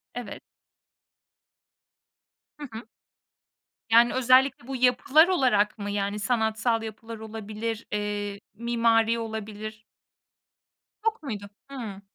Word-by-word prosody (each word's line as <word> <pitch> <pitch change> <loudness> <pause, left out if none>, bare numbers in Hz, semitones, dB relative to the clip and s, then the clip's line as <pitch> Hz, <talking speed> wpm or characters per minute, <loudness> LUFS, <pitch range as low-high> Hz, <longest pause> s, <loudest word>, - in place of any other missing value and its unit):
Evet. 240 -5 -6 2.2
Hı 295 - -9
hı. 220 0 -8 1.0
Yani 235 +1 +6
özellikle 255 0 +4
bu 270 - -4
yapılar 255 +6 +5
olarak 245 - +2
mı 205 -1 -4
yani 200 0 -1
sanatsal 220 +1 +1
yapılar 225 +1 -7
olabilir, 220 +1 -5
eee, 205 -1 -2
mimari 230 0 +2
olabilir? 220 -1 -6 1.2
Yok 445 -6 0
muydu? 205 -6 -5 0.2
Hıı. 225 -8 -7
225 Hz, 95 wpm, -26 LUFS, 210-245 Hz, 2.2 s, Yani